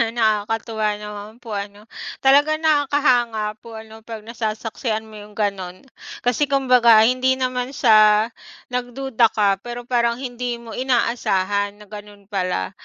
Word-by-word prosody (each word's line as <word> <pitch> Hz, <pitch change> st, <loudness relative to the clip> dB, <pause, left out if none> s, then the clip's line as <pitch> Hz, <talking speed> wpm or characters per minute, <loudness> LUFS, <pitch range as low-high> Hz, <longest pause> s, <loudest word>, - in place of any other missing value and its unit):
Nakakatuwa 220 Hz, -1 st, 0 dB
naman 210 Hz, +2 st, -9 dB
po 230 Hz, -, -9 dB
ano? 200 Hz, +1 st, -7 dB, 0.4 s
Talaga 290 Hz, +3 st, +5 dB
nakakahanga 260 Hz, -8 st, +1 dB
po 230 Hz, -1 st, -12 dB
ano 220 Hz, 0 st, -11 dB
pag 225 Hz, -2 st, -8 dB
nasasaksihan 220 Hz, 0 st, -3 dB
mo 220 Hz, -1 st, -14 dB
yung 210 Hz, 0 st, -13 dB
ganun. 190 Hz, -3 st, -3 dB, 0.4 s
Kasi 245 Hz, +4 st, +1 dB
kumbaga 250 Hz, -5 st, +5 dB
hindi 255 Hz, +2 st, +2 dB
naman 255 Hz, 0 st, -3 dB
siya 215 Hz, -3 st, +5 dB, 0.4 s
nagduda 250 Hz, -1 st, +1 dB
ka. 200 Hz, -2 st, +2 dB
Pero 240 Hz, +2 st, -7 dB
parang 235 Hz, -1 st, +1 dB
hindi 245 Hz, -1 st, -4 dB
mo 235 Hz, -1 st, -11 dB
inaasahan 205 Hz, -5 st, 0 dB
na -, -, -12 dB
ganun 205 Hz, -1 st, -12 dB
pala. 180 Hz, -, -2 dB
225 Hz, 130 wpm, -21 LUFS, 210-250 Hz, 0.4 s, Talaga